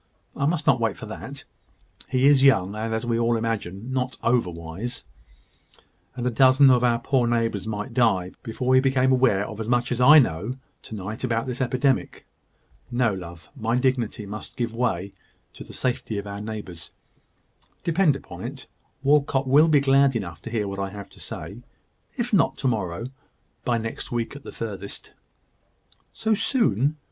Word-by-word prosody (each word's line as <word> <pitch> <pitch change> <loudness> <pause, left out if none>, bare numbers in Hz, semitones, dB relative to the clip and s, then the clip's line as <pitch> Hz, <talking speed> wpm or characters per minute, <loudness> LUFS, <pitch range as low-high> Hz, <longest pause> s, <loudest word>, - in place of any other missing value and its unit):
"I 140 - 0
must 160 -1 -1
not 130 -2 +4
wait 115 -3 0
for - - -8
that. - - -8 0.7
He 130 +1 +2
is 140 -1 +6
young, 100 -9 +4
and, 110 +1 -3
as 110 +1 -2
we 115 -1 0
all 115 0 +2
imagine, 115 0 -3
not 130 0 -2
over 120 -5 +2
wise: 85 +8 -6 1.1
and 125 -2 -4
a 125 - +1
dozen 130 +3 +6
of 125 -1 +3
our 120 -1 +3
poor 125 0 +1
neighbours 115 -4 0
might 105 +2 -4
die 100 -7 +2
before 125 +3 -1
he 130 - +6
became 130 -1 +2
aware 125 -6 +3
of 110 - -8
as 110 - -4
much 120 +1 +1
as 125 0 0
I 150 +5 +9
know 105 - +2 0.3
to 110 - -9
night 105 +4 -6
about 115 -1 0
this 125 0 -4
epidemic. 130 +1 0 0.6
No, 120 -3 +1
love; 85 -3 -9
my 115 -2 -1
dignity 125 -4 0
must 105 +2 -8
give 120 -2 -2
way 100 -5 -1 0.4
to - - -10
the - - -12
safety 120 -4 -2
of 100 - -4
our 100 0 -6
neighbours. 105 -6 -7 0.9
Depend 170 -3 +3
upon 90 -8 -9
it, 130 +3 -7 0.4
Walcot 140 -1 +3
will 145 +5 +6
be 150 -3 +4
glad 135 -1 +4
enough 85 -7 -4
to - - -7
hear 110 -3 -1
what 100 0 -5
I 100 0 -2
have 100 0 -9
to - - -17
say 100 - -7 0.6
if 240 -1 -2
not 190 - +3
to 135 - -1
morrow, 105 -4 -2 0.6
by 120 -2 +1
next 115 0 -5
week 120 +2 -2
at 145 - -9
furthest." 100 -3 -6 1.0
"So 220 -1 0
soon? 155 - +1
120 Hz, 175 wpm, -24 LUFS, 105-130 Hz, 1.1 s, I